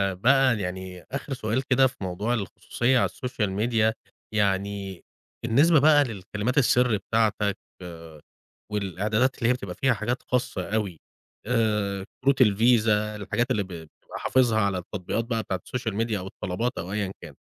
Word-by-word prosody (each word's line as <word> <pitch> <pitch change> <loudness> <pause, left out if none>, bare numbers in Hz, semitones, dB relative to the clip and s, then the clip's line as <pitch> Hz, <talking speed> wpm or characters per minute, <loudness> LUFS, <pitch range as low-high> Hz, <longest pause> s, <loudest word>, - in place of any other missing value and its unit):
بقى 130 +3 +4
يعني 95 -1 -5
آخر 140 +1 -4
سؤال 125 +1 -1
كده 130 0 +4
في 130 - -10
موضوع 95 +5 -2
الخصوصية 120 +3 0
على - - +2
الSocial 125 -4 -3
Media، 110 -1 +2 0.4
يعني 100 -2 -1 0.4
بالنسبة 140 +8 +5
بقى 145 0 +6
للكلمات 105 +2 -3
السر 125 -4 +4
بتاعتَك 105 -1 0 0.2
آآ، 80 -3 -10 0.5
والإعدادات 105 +5 0
اللي 115 - +1
هي - - +5
بتبقى 100 -8 -6
فيها 135 -2 +2
حاجات 120 +4 -2
خاصة 105 -6 -2
أوي، 100 -7 -2 0.5
آآ، 105 -4 0 0.2
كروت 135 0 +3
الفيزا 105 -1 +3
الحاجات 120 +5 -1
اللي 105 -5 +1
ب - - -12
بتبقى 80 -4 -10
حافظها 120 -4 +2
على 100 -2 +1
التطبيقات 95 +4 -3
بقى 115 -1 -2
بتاعة 95 - -3
الSocial 120 -4 -3
Media 115 - -3
أو 95 -2 -4
الطلبات 95 +5 -3
أو 90 +3 -5
أيًا 100 -3 -1
كان، - - -10
110 Hz, 155 wpm, -26 LUFS, 95-125 Hz, 0.5 s, بقى